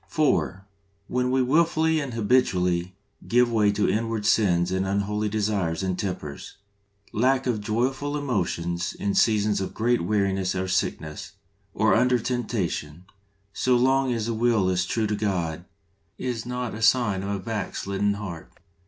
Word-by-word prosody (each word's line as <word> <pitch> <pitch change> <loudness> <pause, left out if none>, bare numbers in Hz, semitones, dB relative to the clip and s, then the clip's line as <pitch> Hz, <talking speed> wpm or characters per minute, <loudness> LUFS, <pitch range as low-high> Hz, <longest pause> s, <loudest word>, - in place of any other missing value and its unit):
(4. 140 - 0 0.2
) 100 0 -42
When 125 0 +2
we 130 0 +2
wilfully 160 +3 +2
and 135 -5 -4
habitually 90 -6 +1 0.3
give 120 0 +3
way 105 -3 +3
to 105 - +1
inward 115 -1 -1
sins 90 -5 +3
and 95 +1 0
unholy 105 +2 -1
desires 100 -5 -1
and 95 -1 -2
tempers. 85 -7 -5 0.6
Lack 130 +4 +2
of 120 -5 0
joyful 130 +7 -1
emotions 90 - -2
in 100 0 -2
seasons 105 -2 +2
of 95 - -5
great 120 +2 +1
weariness 95 -1 0
or 95 0 -2
sickness, 80 -4 -2 0.4
or - - +3
under 125 +2 +4
temptation, 105 -9 -3 0.5
so 130 -1 +2
long 130 +1 +2
as 115 -3 -1
the 115 - -1
will 110 -5 +2
is 90 0 0
true 110 +4 0
to 105 0 -1
God, 90 -6 -2 0.5
is 120 -2 -4
not 125 -1 -3
a 110 - -7
sign 105 -4 +3
of 100 - -4
a 100 - -1
backslidden 100 0 -2
heart. 95 -6 -7
105 Hz, 155 wpm, -25 LUFS, 95-125 Hz, 0.6 s, under